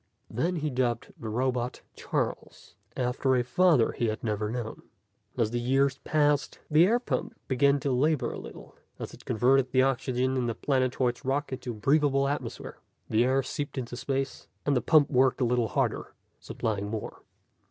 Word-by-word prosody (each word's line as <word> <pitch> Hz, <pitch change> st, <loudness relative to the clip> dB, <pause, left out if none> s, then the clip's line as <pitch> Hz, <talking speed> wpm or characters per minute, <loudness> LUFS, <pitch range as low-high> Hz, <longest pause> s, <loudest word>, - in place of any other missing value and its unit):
Then 165 Hz, +11 st, 0 dB
he 155 Hz, -2 st, -2 dB
dubbed 125 Hz, -2 st, -1 dB
the 110 Hz, -, -7 dB
robot 125 Hz, +1 st, -1 dB
Charles, -, -, -4 dB, 0.2 s
after 130 Hz, +1 st, +1 dB
a 125 Hz, -, +2 dB
father 155 Hz, -2 st, +3 dB
he 120 Hz, -, -1 dB
had 110 Hz, 0 st, -3 dB
never 105 Hz, -2 st, -1 dB
known. 115 Hz, -1 st, -5 dB, 0.6 s
As 110 Hz, -2 st, +1 dB
the 120 Hz, -, -1 dB
years 135 Hz, +2 st, +1 dB
passed, 145 Hz, -3 st, +1 dB
the 160 Hz, +4 st, +6 dB
air 230 Hz, +4 st, +3 dB
pump 245 Hz, -, -3 dB
began 140 Hz, +2 st, +3 dB
to 140 Hz, -, 0 dB
labor 130 Hz, -1 st, +1 dB
a -, -, -6 dB
little -, -, -11 dB, 0.2 s
as -, -, -7 dB
it -, -, -14 dB
converted 130 Hz, +3 st, +3 dB
the 130 Hz, 0 st, +4 dB
oxygen 130 Hz, 0 st, 0 dB
in 125 Hz, -2 st, 0 dB
the 115 Hz, -, -2 dB
planetoid's 130 Hz, -2 st, 0 dB
rock 135 Hz, +1 st, -1 dB
into 130 Hz, -, -6 dB
a 120 Hz, -, -3 dB
breathable 140 Hz, +4 st, +2 dB
atmosphere. 145 Hz, -, -5 dB, 0.3 s
The 110 Hz, +2 st, +4 dB
air 135 Hz, +1 st, +2 dB
seeped 145 Hz, +2 st, -5 dB
into 120 Hz, -2 st, -4 dB
space, 135 Hz, +2 st, -3 dB, 0.2 s
and 145 Hz, -, +2 dB
the 125 Hz, -, +2 dB
pump 150 Hz, +3 st, +4 dB
worked 130 Hz, -1 st, +3 dB
a 125 Hz, -, +2 dB
little 120 Hz, -1 st, +1 dB
harder, -, -, -2 dB, 0.2 s
supplying 100 Hz, -2 st, -3 dB
more. 110 Hz, -1 st, -6 dB
130 Hz, 175 wpm, -28 LUFS, 120-140 Hz, 0.6 s, the